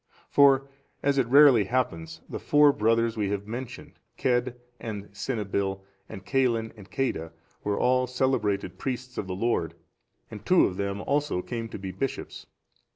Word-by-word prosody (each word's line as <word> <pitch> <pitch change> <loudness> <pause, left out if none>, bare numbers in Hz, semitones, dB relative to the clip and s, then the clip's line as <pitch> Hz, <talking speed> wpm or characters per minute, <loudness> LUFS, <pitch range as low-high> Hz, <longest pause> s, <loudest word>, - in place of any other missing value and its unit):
For, 135 -1 +5 0.4
as 140 -1 +2
it 125 - +1
rarely 135 -5 +7
happens, 95 -9 -2
the - - -6
four 145 -1 +5
brothers 115 +1 +1
we 105 -3 -1
have 100 0 -3
mentioned, 120 +3 -8 0.2
Cedd 125 0 0 0.2
and 105 -3 -6
Cynibill, 100 -3 -2 0.3
and 95 - -9
Caelin 115 0 +1
and 100 -3 -14
Ceadda, 85 -10 -2 0.3
were 100 0 -1
all 130 0 +2
celebrated 110 -8 -1
priests 125 -1 -4
of 95 - -4
the 95 - -3
Lord, 95 -6 -1 0.6
and 105 -2 -9
two 180 +10 +5
of 90 - -3
them 100 0 -2
also 145 -8 -1
came 115 -2 -5
to - - -7
be 95 -1 -6
bishops. 125 +9 -5
115 Hz, 155 wpm, -27 LUFS, 100-130 Hz, 0.6 s, rarely